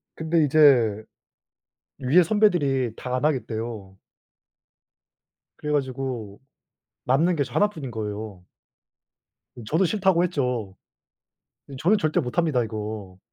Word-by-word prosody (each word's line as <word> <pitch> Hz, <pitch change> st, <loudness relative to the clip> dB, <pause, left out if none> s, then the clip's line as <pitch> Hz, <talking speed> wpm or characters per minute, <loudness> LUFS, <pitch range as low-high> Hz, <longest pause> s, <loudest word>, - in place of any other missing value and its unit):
근데 160 Hz, 0 st, +1 dB
이제 130 Hz, -8 st, +4 dB, 1.0 s
위에 140 Hz, +8 st, +4 dB
선배들이 160 Hz, -, +2 dB
다 -, -, -8 dB
안 130 Hz, -, -3 dB
하겠대요. 110 Hz, -8 st, -3 dB, 1.6 s
그래 150 Hz, -, -4 dB
가지고 130 Hz, -7 st, -3 dB, 0.7 s
남는 160 Hz, +7 st, +2 dB
게 140 Hz, -, +1 dB
저 120 Hz, -, -12 dB
1 205 Hz, -, +3 dB
뿐인 155 Hz, -11 st, -8 dB
거예요. 105 Hz, -4 st, -6 dB, 1.2 s
저도 165 Hz, +9 st, +2 dB
"싫다."고 190 Hz, -2 st, +2 dB
했죠. 125 Hz, -, -2 dB, 1.0 s
"어 -, -, -7 dB
저는 200 Hz, +9 st, +3 dB
절대 155 Hz, -5 st, +1 dB
못합니다 130 Hz, -1 st, 0 dB
이거." 105 Hz, -4 st, -6 dB
130 Hz, 215 characters per minute, -24 LUFS, 110-160 Hz, 1.6 s, 이제